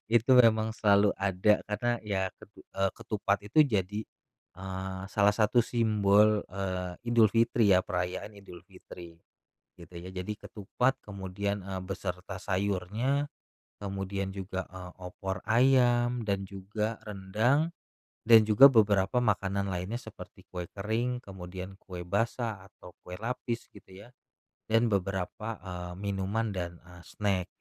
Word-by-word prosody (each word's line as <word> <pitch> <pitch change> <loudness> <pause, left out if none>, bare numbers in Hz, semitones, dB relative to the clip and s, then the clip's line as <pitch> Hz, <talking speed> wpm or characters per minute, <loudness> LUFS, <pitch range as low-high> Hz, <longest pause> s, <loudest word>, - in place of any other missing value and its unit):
Itu 120 +3 +5
emang 110 -1 +4
selalu 105 -2 +4
ada, 100 +2 +2
karena 120 +3 -1
ya, 95 -3 -2
ketu 105 - -16
eee, 95 -1 +1
ketupat 100 -2 -1
itu 105 +9 -1
jadi, 105 -3 -1 0.6
eee, 95 0 -5
salah 105 -1 +3
satu 110 +2 +2
simbol, 105 -2 +3
eee, 95 -2 -3 0.2
Idulfitri 115 -2 +4
ya, 90 - +4
perayaan 90 +4 -3
Idulfitri, 90 -2 -13 0.6
gitu 85 +1 -14
ya. 90 +2 -7
Jadi 95 +3 -4
ketupat 125 +6 -1
kemudian, 100 0 -4
eee, 95 -1 -5
beserta 95 0 -5
sayurnya, 100 +9 -1 0.5
kemudian 95 -1 -4
juga, 95 -1 -4
eee, 90 -1 -9
opor 95 +1 -6
ayam 120 -1 +3
dan 100 -1 -1
juga 105 +3 -3
rendang 110 - +1 0.6
dan 115 -1 +9
juga 110 +6 +8
beberapa 105 0 +3
makanan 100 -3 0
lainnya, 95 +6 -3
seperti - - -12
kue 90 -1 -5
kering, 115 +5 -2
kemudian 95 0 -8
kue 90 -3 -8
basah 110 -1 -1
atau - - -14 0.2
kue 90 - -8
lapis 120 0 -4
gitu 100 - -16 0.2
ya, 120 - -14 0.6
dan 115 +2 +4
beberapa, 100 +2 -2 0.2
eee, 90 -1 -6
minuman 100 +2 -2
dan, 85 -3 -4
eee, 90 0 -14
snack. 95 -3 -1
100 Hz, 130 wpm, -29 LUFS, 95-110 Hz, 0.6 s, dan